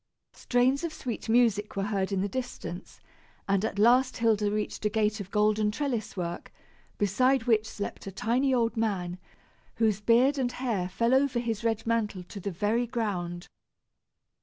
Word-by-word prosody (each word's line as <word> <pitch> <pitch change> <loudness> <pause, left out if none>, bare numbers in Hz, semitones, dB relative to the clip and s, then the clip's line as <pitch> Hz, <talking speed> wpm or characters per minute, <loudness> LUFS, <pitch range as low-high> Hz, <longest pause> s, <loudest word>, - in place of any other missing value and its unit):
Strains 255 +4 +1
of 335 - -2
sweet 240 -6 -5
music 220 -3 +2
were 195 - -1
heard 200 -1 -1
in 195 -1 0
the 200 - 0
distance, 205 -6 -6 0.5
and 200 0 +2
at 220 - -2
last 250 +4 +4
Hilda 215 -3 +2
reached 210 +1 -3
a 210 - +2
gate 215 0 0
of 200 -2 -6
golden 210 0 +2
trellis 235 -3 -3
work, 175 -1 -4 0.5
beside 255 +6 +2
which 220 -2 +2
slept 200 -1 -6
a - - -4
tiny 245 +6 +1
old 235 -3 +1
man, 185 -6 -2 0.6
whose 215 -3 +1
beard 250 +6 +4
and 245 -2 -1
hair 220 -9 -2
fell 230 +6 +1
over 265 -1 +3
his 230 -2 -2
red 225 -1 0
mantle 220 -5 -1
to 200 +3 -9
the 200 - -3
very 210 +6 0
ground. 185 -7 -3
220 Hz, 165 wpm, -28 LUFS, 200-245 Hz, 0.6 s, last